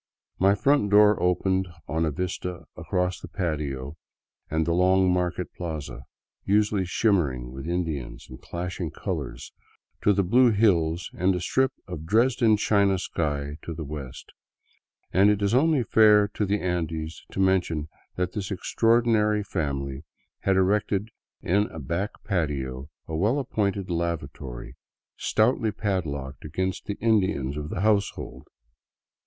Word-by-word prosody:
My 100 +2 +4
front 135 -1 +2
door 105 0 +5
opened 95 +1 +1 0.2
on 80 +1 0
a 80 - 0
vista 90 +2 -4
across 90 0 -1
the - - -9
patio 75 -5 -3 0.5
and 80 0 0
the 85 - +1
long 95 +1 +4
market 90 0 -2
plaza, 75 -8 -6 0.4
usually 105 -1 +2
shimmering 80 - +1
with 65 +4 -7
Indians 80 -7 -3
and 65 - -11
clashing 90 0 -4
colors, - - -5 0.5
to 105 - +4
the 100 0 +2
blue 120 +7 +5
hills 90 -6 +2
and 90 +1 +1
a - - -1
strip 130 +9 +1 0.2
of 80 -4 -7
Dresden 115 +1 +3
china 100 -2 +3
sky 75 -5 -2
to 85 - -6
the 80 - -5
west; 70 -4 -8 0.8
and 95 +3 +5
it 105 -1 +2
is 100 +2 +1
only 145 0 +3
fair 105 -1 +5
to 105 -1 -2
the 100 +2 +1
Andes 80 -3 -3
to - - -5
mention 90 -5 +1 0.3
that 90 -1 -1
this 100 0 -4
extraordinary 110 +1 +2
family 70 -7 -3 0.4
had 95 - +1
erected 100 +2 +1 0.3
in 100 +4 +2
a 90 - -11
back 85 +8 -2
patio 70 -7 -2 0.2
a 80 - -4
well 105 - +2
appointed 100 -8 -1
lavatory, 75 -7 -4 0.4
stoutly 110 - +1
padlocked 75 -11 -3
against 90 +4 -3
the 100 - -3
Indians 95 - +1
of 75 0 -5
the 85 - -3
hotfsehold. 105 -1 0
90 Hz, 140 wpm, -26 LUFS, 80-105 Hz, 0.8 s, door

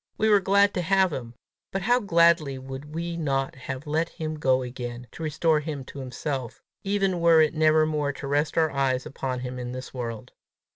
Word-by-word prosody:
We 220 - +2
were 205 -1 +6
glad 200 +1 +3
to 180 - -1
have 190 0 +3
him, 120 -3 -6 0.4
but 195 0 -2
how 245 +4 +4
gladly 170 - +3
would 135 +3 -8
we 170 +1 -3
not 135 -4 -1
have 130 +2 -7
let 160 +3 0
him 155 -2 -5
go 130 -3 +2
again 125 -1 -6
to - - -11
restore 155 0 +2
him 150 -2 -5
to 140 - -9
himself, 130 -1 -4 0.2
even 195 -2 0
were 165 -1 +6
it 155 -2 +4
never 155 0 +4
more 150 -2 0
to 140 - -8
rest 145 +3 0
our 160 -2 +3
eyes 135 -2 0
upon 130 -2 -4
him 125 0 -5
in 125 0 -5
this 130 0 -7
world! 115 -4 -5
150 Hz, 200 wpm, -26 LUFS, 130-170 Hz, 0.4 s, were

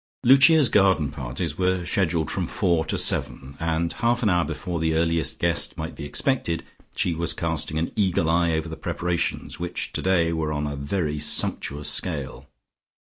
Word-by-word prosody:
Lucia's 140 +3 +6
garden 95 -10 +2
parties 70 +4 -4
were 90 -1 0
scheduled 85 -4 0
from - - -2
four 85 -2 0
to 80 - -2
seven 70 +1 0
and 85 0 -1
half 120 +1 0
an 105 - +3
hour 90 -1 +2
before 85 0 -4
the 80 0 0
earliest 80 0 0
guest - - +1
might 80 +1 -5
be 75 - -8
expected, 85 - -1 0.3
she 90 - 0
was 85 0 +1
casting 80 -2 -1
an 80 +1 -2
eagle 95 -6 +1
eye 85 0 +2
over 80 +1 -2
the 80 - -6
preparations 85 0 -3
which 85 0 -3
today 85 -3 +1
were 80 -1 -2
on 75 -1 -2
a 75 -1 -4
very 75 +1 -2
sumptuous 75 0 +1
scale. 75 -4 -1
85 Hz, 170 wpm, -24 LUFS, 80-90 Hz, 0.3 s, Lucia's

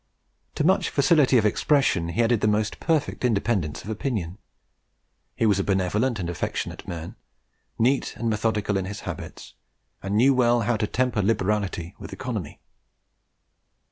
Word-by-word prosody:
To - - 0
much 185 +5 +3
facility 145 -3 +4
of 110 - +3
expression 105 - +2
he 105 +8 +1
added 115 -2 +2
the - - +2
most 105 0 0
perfect 155 -5 -1
independence 100 - 0
of 105 - -8
opinion; 105 -5 -3 1.0
he - - +1
was 100 -3 +3
a - - +1
benevolent 100 +6 0
and 90 -4 -3
affectionate 85 - -4
man; 85 -1 -6 0.6
neat 130 +4 +1
and 115 - -3
methodical 105 -2 0
in 95 - -2
his 100 +1 -6
habits, - - -8 0.5
and 100 +2 -1
knew 135 +5 +5
well 120 -2 +3
how 120 +2 +1
to 105 -1 -1
temper 125 -2 0
liberality 100 -4 -1
with - - -8
economy. 110 - -5
110 Hz, 150 wpm, -25 LUFS, 95-125 Hz, 1.0 s, knew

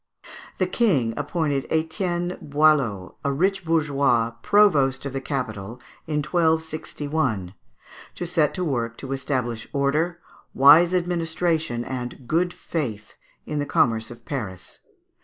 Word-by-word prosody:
The 185 - +2
King 180 - +1
appointed 145 -2 -1
Etienne 175 +2 -1
Boileau, 140 -10 +2
a 140 - +1
rich 190 +7 +1
bourgeois, 140 -8 +2
provost 145 -11 +3
of 140 - -4
the 135 - -3
capital 115 -5 -4 0.3
in 150 -1 -1
1261, 155 - -1 0.6
to 175 - -4
set 165 -4 +1
to 185 - -2
work 115 -6 -2
to 135 - -7
establish 125 -4 -2
order, 150 +5 0 0.4
wise 160 +6 +7
administration, 165 -7 -1
and 125 -1 -6
"good 175 +5 +1
faith" 120 -13 -5 0.3
in 150 -1 -3
the 145 - -2
commerce 115 -2 +2
of 120 -1 -12
Paris. 110 - -6
145 Hz, 120 wpm, -24 LUFS, 125-165 Hz, 0.6 s, wise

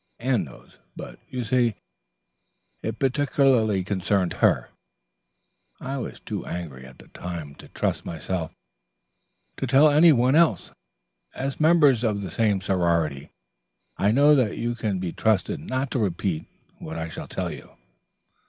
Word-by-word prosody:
Anne 120 -4 0
knows, 65 - -16 0.2
but, - - -9
you 125 -1 -3
see, 120 -1 +1 1.1
it 110 +1 -4
particularly 130 -7 +2
concerned 95 0 0
her. - - +2 1.1
I 135 +1 -4
was - - -6
too - - -5
angry 70 -7 -7
at 65 - -15
the - - -16
time 85 -5 -7
to - - -14
trust - - -2
myself 85 0 -4 1.1
to 135 - -2
tell 140 +4 +6
any 160 +3 +7
one 130 -1 +3
else. 165 +1 +3 0.6
As 135 +1 -4
members 150 -7 +4
of 105 -3 0
the 95 - -6
same 105 -4 +1
sorority, 85 -7 0 0.7
I 100 - +1
know 140 +7 +5
that 125 -7 +2
you 120 +1 -1
can 110 -4 -2
be 90 -2 -4
trusted 110 -5 0
not 130 0 -3
to - - 0
repeat 90 -4 -2 0.3
what - - -7
I 80 0 -3
shall 80 - -8
tell - - -3
you." - - -11
110 Hz, 145 wpm, -25 LUFS, 90-130 Hz, 1.1 s, any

